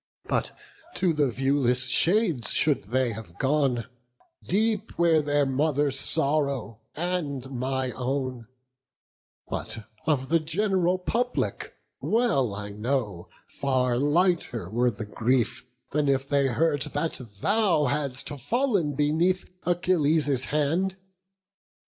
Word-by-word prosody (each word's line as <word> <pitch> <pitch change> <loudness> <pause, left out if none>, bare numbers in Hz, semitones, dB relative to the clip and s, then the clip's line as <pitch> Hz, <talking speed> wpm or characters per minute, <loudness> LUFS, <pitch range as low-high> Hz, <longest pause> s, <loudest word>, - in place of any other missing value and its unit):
But - - -2 0.4
to 180 -3 +2
the 145 -3 +2
viewless 130 0 +1
shades 170 - +2
should 150 -9 +1
they 125 +3 +1
have 100 -6 -9
gone, 135 -3 +1 0.6
Deep 215 +2 0
were 165 -2 +4
their 145 -1 +1
mother's 140 0 +1
sorrow 140 -8 0 0.2
and 150 -6 -2
my 130 0 -1
own; 130 -2 -3 1.0
But 110 -1 -5 0.2
of 135 -4 +1
the 165 +1 +4
gen'ral 180 +2 +1
public, 240 +7 -2 0.2
well 205 - +1
I 100 0 -6
know 105 -4 -2 0.2
Far 130 -3 0
lighter 145 - +1
were 120 +2 +2
the 110 -1 -6
grief, 120 +3 0 0.2
than 150 0 +1
if 135 0 +1
they 140 -1 +2
heard 145 +3 +1
That 165 -4 -2 0.2
thou 200 -7 +3
hadst 140 -1 -2
fall'n 165 - 0
beneath 165 +6 +1 0.2
Achilles' 155 -6 +2
hand. 165 +6 0
140 Hz, 110 wpm, -26 LUFS, 130-165 Hz, 1.0 s, were